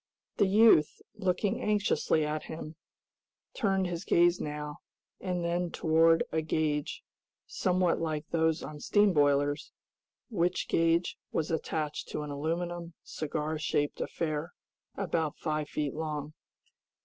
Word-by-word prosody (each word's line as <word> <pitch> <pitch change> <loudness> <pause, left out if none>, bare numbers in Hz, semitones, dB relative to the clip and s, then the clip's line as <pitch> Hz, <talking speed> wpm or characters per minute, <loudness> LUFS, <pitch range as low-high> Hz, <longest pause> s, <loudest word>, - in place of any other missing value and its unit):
The 200 - +4
youth, 200 -6 +5
looking 190 +2 0
anxiously 205 -7 +1
at 150 0 -3
him, 160 0 -7 0.8
turned 195 -5 +1
his 175 0 -3
gaze 175 -1 +4
now 150 0 -5 0.4
and 180 -2 -2
then 175 +1 0
toward 165 0 +4
a 160 - +1
gauge, 155 -2 -1 0.4
somewhat 180 -1 +1
like 155 -1 -2
those 160 -1 +1
on 150 -1 -7
steam 205 +4 +3
boilers, 145 0 +2 0.6
which 180 -3 0
gauge 165 +1 +2
was 160 0 -1
attached 155 -1 -2
to 150 - -4
an 150 - -6
aluminum, 170 +3 -3
cigar 155 0 -3
shaped 145 -1 -1
affair, 155 0 -3 0.4
about 165 -5 -1
five 155 -1 -2
feet 150 -3 -2
long. 150 -1 -4
160 Hz, 125 wpm, -30 LUFS, 150-175 Hz, 0.8 s, youth